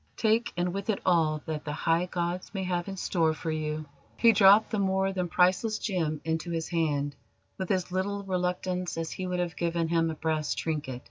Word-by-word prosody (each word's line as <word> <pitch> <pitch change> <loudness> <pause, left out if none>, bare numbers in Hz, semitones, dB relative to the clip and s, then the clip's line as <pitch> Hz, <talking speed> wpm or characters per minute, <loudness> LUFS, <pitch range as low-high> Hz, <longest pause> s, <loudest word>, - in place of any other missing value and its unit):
"Take, 225 +1 +2
and 175 0 0
with 200 +2 -4
it 210 - +1
all 160 -4 +2
that 155 -1 -4
the 150 - -4
High 165 +4 +1
Gods 180 +3 -3
may 190 - -1
have 180 -1 -1
in 195 -1 -5
store 165 -4 +1
for 160 - -3
you!" 155 0 -3 0.3
He 230 - +6
dropped 205 +1 +6
the 215 - 0
more 190 0 +1
than 180 -2 -1
priceless 185 +5 +2
gem 160 -7 -1
into 160 +1 -1
his 165 -1 -2
hand 145 -4 0 0.4
with 190 - -3
as 185 -2 0
little 200 +2 -1
reluctance 180 -1 -2
as 165 -1 -3
he 185 - -4
would 180 0 -2
have 175 -3 -2
given 170 -1 -1
him 165 -1 +2
a 160 - -3
brass 155 -1 -1
trinket. 150 -6 -3
175 Hz, 205 wpm, -28 LUFS, 160-190 Hz, 0.4 s, He